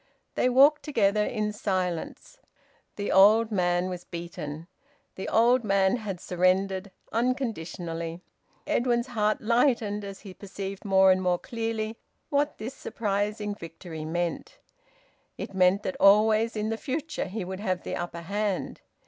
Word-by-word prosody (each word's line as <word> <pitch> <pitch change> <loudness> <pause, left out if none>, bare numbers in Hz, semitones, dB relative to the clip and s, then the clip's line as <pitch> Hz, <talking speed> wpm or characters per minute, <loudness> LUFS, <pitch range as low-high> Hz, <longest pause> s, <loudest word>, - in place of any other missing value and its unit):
They 250 - +2
walked 280 +4 +6
together 210 -7 +2
in 210 0 -2
silence. 185 - -3 0.6
The 205 - -3
old 215 +4 +6
man 175 -2 +1
was 180 -1 -5
beaten. 165 -3 -7 0.5
The 190 - -5
old 240 +2 +4
man 195 +1 +2
had 200 -6 -5
surrendered, 185 +2 +1 0.2
unconditionally. 175 -9 -2 0.4
Edwin's 240 -1 +1
heart 215 -4 0
lightened 230 -3 +1
as 195 -1 -8
he 195 - -10
perceived 195 0 -7
more 190 -1 +5
and 185 0 +2
more 180 -1 +2
clearly 225 -1 -3 0.3
what 290 +1 +1
this 230 +5 -6
surprising 210 -3 -2
victory 165 -3 -8
meant. 175 - -3 0.8
It - - -6
meant 185 +2 +3
that 185 - -3
always 215 +3 +5
in 215 0 -1
the 225 - -2
future 305 +6 -3
he 195 0 -5
would 190 +1 -6
have 185 -4 -2
the - - -4
upper 175 -1 -5
hand. 200 +2 -2
200 Hz, 140 wpm, -27 LUFS, 185-225 Hz, 0.8 s, walked